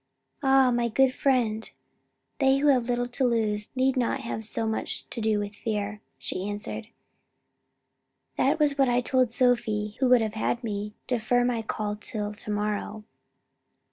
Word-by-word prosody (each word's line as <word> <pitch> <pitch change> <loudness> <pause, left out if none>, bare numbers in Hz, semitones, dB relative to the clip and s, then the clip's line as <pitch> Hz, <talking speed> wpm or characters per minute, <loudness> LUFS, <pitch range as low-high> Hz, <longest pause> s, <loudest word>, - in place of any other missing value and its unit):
"Ah, 270 -2 +5
my 240 0 +1
good 255 +3 +3
friend, 235 -6 +1 0.7
they 270 -1 +4
who 290 +1 +3
have 250 -3 +3
little 245 0 0
to 255 +2 -1
lose, 215 -4 +1
need 260 +1 +2
not 255 +1 0
have 230 -3 -4 0.2
much 220 - -3
to 230 - -4
do 215 -1 +2
with 205 0 -3
fear," 210 -1 -3 0.2
she 190 +2 -3
answered. 210 +1 -5 1.5
"That 285 +4 +2
was 295 -2 +2
what 270 -2 +4
I 245 0 +3
told 255 -1 +2
Sophie 225 -4 +1
who 260 -2 +3
would 250 -2 +6
have 215 -1 -1
had 235 +2 -1
me 210 -1 -4
defer 245 0 +1
my 240 -2 0
call 210 -1 -3
till 210 -1 -4
to 210 - -10
morrow." 210 +1 -2
235 Hz, 160 wpm, -27 LUFS, 210-255 Hz, 1.5 s, would